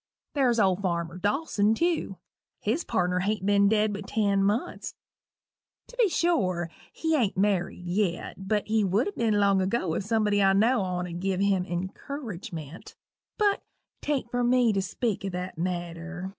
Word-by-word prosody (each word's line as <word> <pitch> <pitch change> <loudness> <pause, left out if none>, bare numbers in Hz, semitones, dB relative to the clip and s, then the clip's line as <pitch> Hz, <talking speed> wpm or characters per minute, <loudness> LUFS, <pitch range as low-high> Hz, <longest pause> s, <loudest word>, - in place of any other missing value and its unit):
There's 250 -5 +2
old 190 -2 +3
farmer 170 -2 -2
Dawson, 210 - +1
tew 330 - 0 0.4
his 240 +11 -1
pardner 180 0 0
hain't 200 +1 -1
ben 200 0 +4
dead 215 -1 +2
but 200 -1 -6
ten 200 -3 +1
months. 215 - -1 0.9
To - - -14
be 465 -5 +4
sure, 185 - +1 0.2
he 320 -1 0
ain't 225 -10 +1
married 190 -2 0
yet 190 0 -2
but 210 0 +1
he 220 0 +2
would 200 - +1
a - - -6
ben 230 - 0
long 200 -1 +4
enough 190 0 +1
ago 190 -6 0
if 190 - -1
somebody 210 -1 +2
I 195 0 +5
know 225 +4 +3
on'd 180 -2 -3
gin 190 0 0
him 195 -2 +2
any 175 +2 -2
incurridgement. 190 - -8 0.4
But 410 -2 +2 0.4
'tain't 275 -5 -2
for 245 0 0
me 245 -2 +4
to 195 - +1
speak 205 +2 -2
o' 195 - -2
that 180 -1 -5
matter. 175 +1 -4
200 Hz, 170 wpm, -27 LUFS, 180-230 Hz, 0.9 s, I